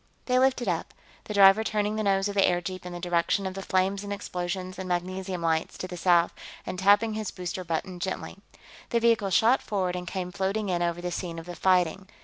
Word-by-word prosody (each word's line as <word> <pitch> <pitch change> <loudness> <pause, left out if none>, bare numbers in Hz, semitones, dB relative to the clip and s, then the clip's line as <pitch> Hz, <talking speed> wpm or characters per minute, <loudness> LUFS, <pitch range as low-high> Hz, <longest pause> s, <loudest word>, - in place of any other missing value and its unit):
They 250 0 +2
lifted 255 -3 +2
up, 170 -3 -2 0.3
the 210 - -5
driver 195 +2 +7
turning 210 -1 -1
the 215 - -1
nose 195 -1 +2
of 205 - -3
the 200 - +3
airjeep 180 0 0
in - - -7
the 175 - -6
direction 175 +2 0
of 190 - -3
the 195 - -6
flames 190 +1 0
and 205 - -6
explosions 185 -1 -4
and 185 -1 -5
magnesium 185 0 -3
lights 160 -1 0
to 185 - -5
the 180 - -7
south 175 -1 +3 0.3
and 185 - -5
tapping 205 +3 +4
his 215 -1 -3
booster 180 0 -5
button 175 +2 -3
gently. 190 +2 -4 0.5
The 235 - +2
vehicle 230 -3 +3
shot 225 +8 +4
forward 185 -3 -1
and 180 0 -5
came 180 0 -4
floating 200 +2 -1
in 175 -1 0
over 170 0 -1
the 180 0 -3
scene 170 -2 -4
of 165 - -7
the 175 0 -7
fighting. 185 0 +2
185 Hz, 220 wpm, -27 LUFS, 175-200 Hz, 0.5 s, driver